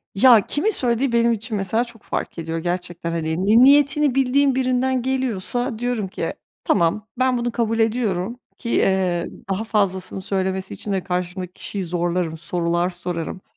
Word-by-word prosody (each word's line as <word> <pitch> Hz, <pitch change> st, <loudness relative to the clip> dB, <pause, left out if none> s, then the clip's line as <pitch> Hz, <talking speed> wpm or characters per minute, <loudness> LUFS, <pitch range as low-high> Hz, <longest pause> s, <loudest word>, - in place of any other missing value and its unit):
Ya, 235 Hz, -2 st, +6 dB
kimin 415 Hz, +10 st, +1 dB
söylediği 245 Hz, -, 0 dB
benim 235 Hz, 0 st, +3 dB
için 220 Hz, 0 st, -4 dB
mesela 220 Hz, +5 st, 0 dB
çok 235 Hz, -3 st, -11 dB
fark -, -, -4 dB
ediyor 165 Hz, 0 st, -3 dB
gerçekten, 175 Hz, 0 st, -3 dB
hani, 165 Hz, +2 st, -1 dB
ni 225 Hz, +4 st, +6 dB
niyetini 285 Hz, 0 st, +5 dB
bildiğin 270 Hz, 0 st, +3 dB
birinden 255 Hz, 0 st, +1 dB
geliyorsa 245 Hz, -2 st, -1 dB
diyorum 245 Hz, -5 st, -1 dB
ki 165 Hz, -3 st, -4 dB, 0.3 s
tamam 175 Hz, +6 st, +1 dB
ben 255 Hz, -1 st, +3 dB
bunu 240 Hz, 0 st, -1 dB
kabul 230 Hz, -1 st, 0 dB
ediyorum 225 Hz, -1 st, 0 dB, 0.2 s
ki, 235 Hz, -, -6 dB
eee, 185 Hz, -5 st, +2 dB, 0.2 s
daha 195 Hz, +3 st, -1 dB
fazlasını 195 Hz, -3 st, -1 dB
söylemesi 190 Hz, -1 st, -2 dB
için 205 Hz, -, -4 dB
de 190 Hz, -2 st, -1 dB
karşımdaki 180 Hz, 0 st, -3 dB
kişiyi 195 Hz, -2 st, -5 dB
zorlarım 175 Hz, -1 st, -1 dB
sorular 170 Hz, +1 st, -1 dB
sorarım. 175 Hz, 0 st, -5 dB
205 Hz, 155 wpm, -22 LUFS, 180-245 Hz, 0.3 s, Ya